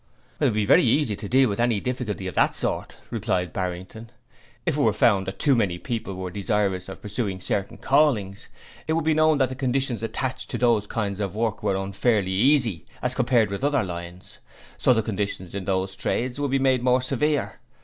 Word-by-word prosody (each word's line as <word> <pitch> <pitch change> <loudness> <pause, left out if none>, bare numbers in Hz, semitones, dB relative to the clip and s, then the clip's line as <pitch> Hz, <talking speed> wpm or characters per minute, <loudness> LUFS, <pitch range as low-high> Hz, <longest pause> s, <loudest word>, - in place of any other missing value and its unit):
'It - - +2
would - - +3
be 105 -1 +1
very - - +6
easy 120 -2 +2
to 100 0 -7
deal 130 +1 +5
with 100 -1 -3
any 120 -3 +2
difficulty 120 -5 -3
of 95 - -4
that - - +2
sort,' - - -3
replied 100 -6 -1
Barrington, 95 +5 -5 0.6
'if - - +1
it - - 0
were - - +3
found 95 -1 +3
that 95 - -5
too 140 -3 +3
many 100 -7 +1
people 110 -2 -4
were 95 -1 -5
desirous 100 -2 -1
of 95 - -10
pursuing 105 -2 -3
certain 95 +1 -2
callings, 120 -9 +1 0.4
it 160 - +1
would 165 -1 0
be 160 - +3
known 155 0 +4
that 130 -2 +2
the - - -4
conditions 130 -2 -1
attached 130 +3 -3
to - - -3
those 115 -4 +2
kinds 100 -3 -3
of 100 -1 -3
work 110 -1 -1
were 95 - 0
unfairly 95 +1 0
easy, 115 - +2 0.2
as 125 0 0
compared 120 -5 +2
with 100 +6 -4
other 145 -4 +2
lines, 85 0 -8 0.4
so - - +3
the 115 -3 +3
conditions 100 -4 -3
in 100 -2 -4
those 95 0 -1
trades 125 +2 -2
would 145 -1 0
be 135 - +2
made 130 -2 +2
more 125 0 +2
severe. 145 +2 -1
110 Hz, 205 wpm, -24 LUFS, 95-130 Hz, 0.6 s, very